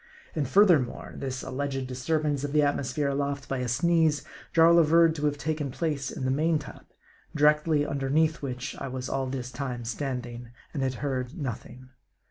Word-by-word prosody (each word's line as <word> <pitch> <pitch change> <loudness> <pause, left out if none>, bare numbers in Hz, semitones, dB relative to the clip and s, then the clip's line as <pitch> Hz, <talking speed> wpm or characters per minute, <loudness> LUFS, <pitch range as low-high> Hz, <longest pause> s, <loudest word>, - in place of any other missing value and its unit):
And 150 -4 -1
furthermore, 165 -7 +3
this 130 -1 -4
alleged 135 0 -3
disturbance 145 +3 -1
of 145 0 -3
the 150 -1 +4
atmosphere 145 0 0
aloft 140 0 -2
by 135 - -2
a 125 - -2
sneeze, 160 +4 +2 0.3
Jarl 165 +1 +6
averred 165 0 +5
to 150 -1 -3
have 145 0 -1
taken 150 -1 -2
place 145 -1 -2
in 130 - -5
the 130 - +1
main 155 +4 +2
top; 150 -3 -10 0.5
directly 150 0 +3
underneath 150 +3 +1
which 130 0 -4
I - - -3
was 130 0 -5
all 135 -1 -1
this 130 -1 -4
time 125 -4 -4
standing, 125 -2 -4 0.2
and 145 - -2
had 130 -1 0
heard 130 +2 -3
nothing. 130 -2 -6
140 Hz, 170 wpm, -27 LUFS, 130-155 Hz, 0.5 s, Jarl